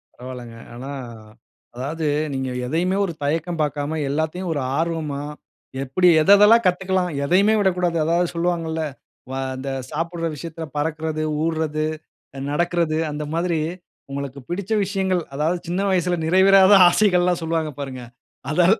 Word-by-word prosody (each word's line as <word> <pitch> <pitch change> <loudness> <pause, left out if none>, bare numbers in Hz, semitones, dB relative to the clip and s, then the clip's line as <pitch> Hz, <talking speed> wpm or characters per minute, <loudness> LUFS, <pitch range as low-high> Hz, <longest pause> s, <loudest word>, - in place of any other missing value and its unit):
பரவால்லங்க. 125 -2 -9 0.2
ஆனா, 130 +3 -7 0.8
அதாவது 150 +6 -4 0.3
நீங்க 130 -1 -2 0.2
எதையுமே 175 +8 0
ஒரு 170 - -4
தயக்கம் 165 +3 -1
பாக்காம, 145 +1 -2
எல்லாவத்தையும் 160 +5 -2
ஒரு 145 - -2 0.2
ஆர்வமா 160 -4 -2 0.6
எப்டி, 135 +7 +2
எத 170 - 0
எதெல்லாம் 225 +3 +6
கத்துக்கலாம்? 185 0 0
எதயுமே 195 +8 +4
விடக்கூடாது, 180 -3 +1
அதாவது 170 +2 +2
சொல்லுவாங்கல. 165 -2 -1 0.5
அ, 130 - -4 0.2
அந்த 135 +1 -5 0.2
சாப்புடுற 165 +2 -3
விஷயத்துல 165 +2 -7
பறக்குறது, 155 +1 -2 0.2
ஊர்ரது 155 -2 -1 0.5
அ, - - -6
நடக்குறது. 170 0 0
அந்த 150 +1 -4
மாதிரி, 170 0 0 0.5
உங்களுக்கு 140 0 -5
பிடிச்ச 190 +4 -4
விஷயங்கள், 190 -2 0
அதாவது 160 +5 0
சின்ன 180 +3 -1
வயசுல 180 -1 +1
நிறைவேறாத 190 +3 +6 0.2
ஆசைகள்லாம் 180 -2 +2
சொல்வாங்க, 160 -1 -1
பாருங்க. 130 -2 -6 0.5
அது, 175 +3 +3
165 Hz, 130 wpm, -22 LUFS, 150-180 Hz, 0.8 s, எதெல்லாம்